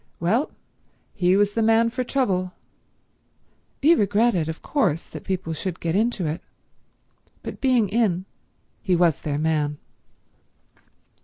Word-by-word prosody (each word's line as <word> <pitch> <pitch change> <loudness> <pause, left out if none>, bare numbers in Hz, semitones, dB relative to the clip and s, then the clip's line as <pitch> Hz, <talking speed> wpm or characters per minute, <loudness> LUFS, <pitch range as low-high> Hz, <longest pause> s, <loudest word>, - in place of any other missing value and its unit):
Well, 215 - +1 0.6
he 185 0 +3
was 205 0 +2
the 225 - 0
man 225 +1 +3
for 255 +1 -2
trouble. 190 -9 0 1.3
He 320 +4 +7
regretted, 205 - +2
of 160 - -6
course, 180 - 0
that - - -10
people 185 -3 -3
should 175 +2 -4
get 165 0 -1
into 215 -3 +1
it, 155 +1 -3 1.0
but - - -7
being 250 -5 +3
in 195 -4 +1 0.6
he 190 -4 +1
was 170 -4 +2
their 145 -2 -2
man. 150 -1 0
190 Hz, 130 wpm, -24 LUFS, 170-230 Hz, 1.3 s, He